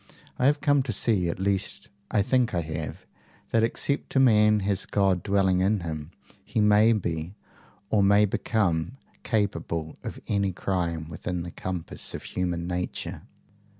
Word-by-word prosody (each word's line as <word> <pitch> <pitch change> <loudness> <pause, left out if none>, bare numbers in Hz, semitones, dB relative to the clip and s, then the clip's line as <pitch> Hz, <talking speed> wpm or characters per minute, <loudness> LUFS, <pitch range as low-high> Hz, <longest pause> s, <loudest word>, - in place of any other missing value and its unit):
I 125 - +4
have 145 0 +2
come 145 -1 +3
to 130 -2 -3
see 100 -4 +2
at 85 - -4
least 95 0 -2 0.2
I 105 - +2
think 120 -2 +1
I 85 - +1
have 80 -1 -6 0.5
that 115 - +3
except 140 +6 -1
a - - +5
man 105 -4 +5
has 100 -1 -1
God 95 -3 +2
dwelling 95 -2 +2
in 100 +2 +2
him, 80 -2 -5 0.3
he - - -2
may 105 +2 +5
be, 85 -4 -2 0.6
or 105 - +4
may 100 +1 +5
become, 100 0 0 0.2
capable 85 -8 -2
of - - -6
any 100 -2 0
crime 85 -4 -2
within 85 +2 -4
the 85 - -7
compass 90 -2 -4
of - - -7
human 90 -2 -2
nature." 90 0 -4
95 Hz, 155 wpm, -26 LUFS, 85-105 Hz, 0.6 s, a